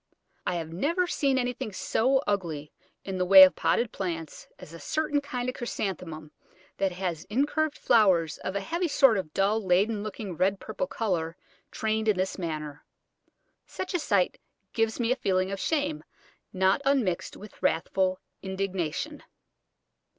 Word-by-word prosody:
I 180 - 0
have 165 -1 -4
never 330 - +1
seen 275 -6 +1
anything 245 -3 -2
so 260 +7 +1
ugly 165 -8 -2 0.3
in 190 -1 -4
the - - +2
way 190 +1 +10
of 185 - +6
potted 175 +8 +1
plants 165 -5 -5
as 160 - -12
a 165 - -9
certain 295 - 0
kind 250 -3 -4
of 255 - -1
Chrysanthemum 180 - -5 0.5
that 195 -2 0
has 175 -3 -3
incurved 290 +6 0
flowers 185 -9 +3
of 190 - -4
a 200 - 0
heavy 340 - -1
sort 270 -6 +5
of 155 -5 -6
dull 205 +5 +1
leaden 200 +4 +2
looking 210 -3 -6
red 190 +4 +1
purple 225 +5 -4
colour 170 -7 -2 0.3
trained 220 0 -1
in 210 -3 +3
this 190 +1 -2
manner. 155 -4 -5 0.8
Such 375 - -5
a 355 - +1
sight 200 - +1 0.3
gives 225 0 0
me 235 0 +1
a - - +3
feeling 190 -6 0
of 195 - -4
shame, 300 +2 -1 0.5
not 190 +3 +2
unmixed 260 -11 0
with 210 +1 -13
wrathful 185 +3 +1 0.2
indignation. 190 -4 -3
195 Hz, 155 wpm, -27 LUFS, 180-245 Hz, 0.8 s, way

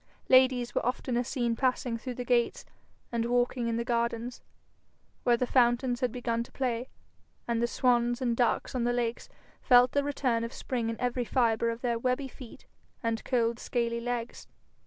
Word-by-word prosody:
Ladies 255 -2 +4
were - - 0
oftener 250 0 -1
seen 240 -2 -1
passing 250 -1 0
through 245 +2 -6
the 245 - -5
gates 240 -1 +1 0.5
and 235 -1 -1
walking 245 0 +1
in 230 0 -1
the 235 - -1
gardens 235 0 -1 0.8
where 240 -1 +3
the 250 - 0
fountains 245 0 +2
had 250 -3 0
begun 235 -1 -2
to 235 - -8
play, 250 -1 -2 0.6
and 235 -1 0
the 235 - +2
swans 240 0 +2
and 240 -3 0
ducks 240 0 +1
on 250 -2 -1
the 240 0 +1
lakes 240 -1 -2 0.3
felt 245 0 +6
the 285 - +1
return 260 -5 0
of 230 - -5
spring 235 -3 -3
in 230 - -4
every 245 0 0
fibre 230 -1 +1
of 230 +1 -4
their 235 -2 0
webby 255 +3 0
feet 255 -2 -12 0.4
and 230 0 -1
cold 235 -2 +1
scaly 235 -1 -1
legs. 240 0 -4
240 Hz, 180 wpm, -29 LUFS, 235-250 Hz, 0.8 s, felt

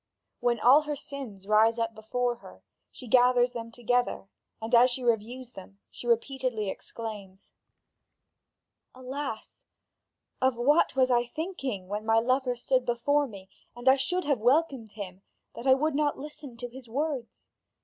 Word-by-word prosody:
When 240 -1 +1
all 265 +7 +7
her 295 -1 -2
sins 260 -9 -8
rise 220 +2 +4
up 230 -1 -1
before 240 +3 -2
her, 95 - -15 0.3
she - - -11
gathers 245 +1 +4
them 230 -1 -6
together, 245 -3 -1 0.3
and 225 +2 -6
as 245 +2 +7
she 255 +1 -3
reviews 240 +2 -1
them, 195 -2 -12
she 240 - -8
repeatedly 235 -3 0
exclaims: 205 -4 -8 1.4
"Alas! 255 -2 -6 0.8
of 260 -1 +3
what 275 +7 +3
was 260 -1 +3
I 240 0 +3
thinking 275 - -4
when 205 +2 -3
my 225 0 +3
lover 255 +2 +1
stood 255 +1 +1
before 280 +5 +1
me 195 -5 -11 0.3
and 240 +1 -9
I 265 - +8
should 355 +7 -1
have 285 -5 +1
welcomed 250 -3 +1
him, 195 -3 -8 0.3
that 245 - -6
I 260 - +7
would 305 +3 0
not 290 0 +1
listen 285 -3 -9
to 245 +1 -5
his 245 0 -12
words? 275 -1 -4
245 Hz, 155 wpm, -28 LUFS, 225-265 Hz, 1.4 s, I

